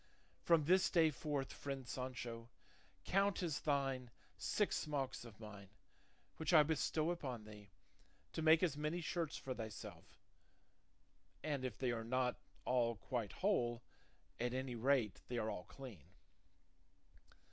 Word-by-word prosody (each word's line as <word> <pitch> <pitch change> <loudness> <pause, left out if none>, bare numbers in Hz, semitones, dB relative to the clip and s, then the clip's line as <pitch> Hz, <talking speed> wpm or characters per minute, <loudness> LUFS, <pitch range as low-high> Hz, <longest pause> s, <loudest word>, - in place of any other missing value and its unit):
From 165 -3 +4
this 185 +4 +5
day 165 -3 +5
forth, 145 -1 -2
friend 135 -3 -5
Sancho, 120 -3 -4 0.6
count 195 0 +2
as 160 -4 0
thine 135 -4 0 0.3
six 210 - +1
smocks 140 -6 -2
of 110 -3 -12
mine 105 -3 -9 0.7
which 160 +1 0
I 155 - +10
bestow 160 +1 +1
upon 130 -10 -4
thee, 105 -1 -11 0.6
to - - -2
make 160 +2 +6
as 165 -6 +3
many 150 +4 -1
shirts 165 -2 -1
for 130 - -4
thyself, 110 -3 -8 1.2
and 145 -4 -1
if 125 -4 -3
they 130 -2 +1
are 115 -1 -2
not 125 +1 +1 0.3
all 120 -2 +3
quite 115 -1 -3
whole, 120 - +2 0.6
at 120 +1 0
any 130 -1 -2
rate 120 -3 +2
they 120 - -2
are 110 -1 0
all 90 - -5
clean." 120 - -10
130 Hz, 135 wpm, -40 LUFS, 120-155 Hz, 1.2 s, I